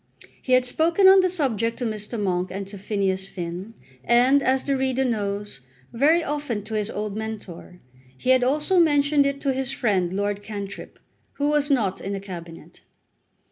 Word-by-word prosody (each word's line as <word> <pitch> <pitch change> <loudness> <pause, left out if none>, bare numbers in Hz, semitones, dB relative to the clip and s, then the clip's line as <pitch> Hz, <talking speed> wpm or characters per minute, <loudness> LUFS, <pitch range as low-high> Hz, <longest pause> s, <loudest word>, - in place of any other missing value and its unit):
He 255 - -1
had 255 0 +4
spoken 330 +9 +3
on 385 0 +8
the 370 -1 +3
subject 230 - -1
to 250 - -3
Mr. 215 +1 -4
Monk 185 -2 -1
and 195 +1 -5
to 200 - -8
Phineas 195 -2 -1
Finn, 180 +5 -7 0.3
and, 250 +4 +4
as 265 0 +1
the 275 - 0
reader 265 0 0
knows, 205 - -3 0.3
very 305 +8 +3
often 290 -8 -3
to 220 +1 -8
his 210 -1 -1
old 210 -1 -4
mentor. 215 -5 -7 0.4
He 255 - +1
had 260 -1 +4
also 300 +8 +2
mentioned 290 -3 +3
it 280 0 -2
to 275 -2 0
his 265 0 -1
friend 195 -9 0
Lord 205 +1 -2
Cantrip, 205 -1 -7 0.4
who 290 +1 -1
was 295 -1 +1
not 215 -9 +1
in 195 - -4
the 195 - -3
Cabinet. 170 -4 -10
230 Hz, 180 wpm, -24 LUFS, 200-280 Hz, 0.4 s, on